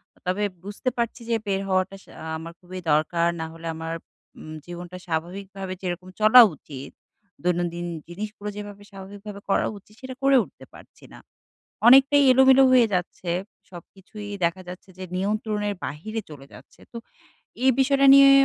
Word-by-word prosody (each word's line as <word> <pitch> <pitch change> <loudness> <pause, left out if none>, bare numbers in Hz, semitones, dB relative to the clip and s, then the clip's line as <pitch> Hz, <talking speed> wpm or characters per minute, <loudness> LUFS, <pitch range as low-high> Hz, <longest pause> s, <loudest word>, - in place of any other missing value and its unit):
আ - - -30
তবে 185 +3 -1 0.2
বুঝতে 205 +6 -3
পারছি 235 0 -2
যে 230 - +2
বের 195 -1 0
হওয়াটা 185 0 0
সা - - -18 0.3
আমার 165 +1 -9
খুবই 185 +1 -9
দরকার। 170 +3 +2
না - - -2
হলে 165 0 -9
আমার 165 0 -5 0.5
উম 155 - -9
জীবনটা 175 +1 -8
স্বাভাবিকভাবে 185 +3 -4
যেরকম 180 0 -4
চলা 220 +4 +9
উচিত, 135 -1 -10 0.5
দৈনন্দিন 175 -1 -1 0.2
জিনিসগুলো 210 +3 -6
যেভাবে 205 -1 -8
স্বাভাবিকভাবে 200 +1 -10
করা - - +2
উচিত, 200 +1 -19
সেটা 260 0 -7
করে 275 0 +5
উঠতে - - -15
পারছি - - -16
না। - - -12 0.7
অনেকটাই 275 +3 +7
এলোমেলো 265 +1 +6
হয়ে 250 -2 +6
যাচ্ছে। 180 0 -3 0.4
সবকিছুই 195 +4 -11 0.2
দেখা 170 +3 0
যাচ্ছে 180 +2 -10
যে 185 - -6
নিয়ন্ত্রণের 210 +1 -1
বাহিরে 215 +10 -5
চলে 140 -2 -11
যাচ্ছে। - - -16
তো - - -9 0.7
এই 265 - +7
বিষয়টা 275 +1 +4
নিয়ে 275 0 +8
195 Hz, 155 wpm, -24 LUFS, 175-215 Hz, 0.7 s, চলা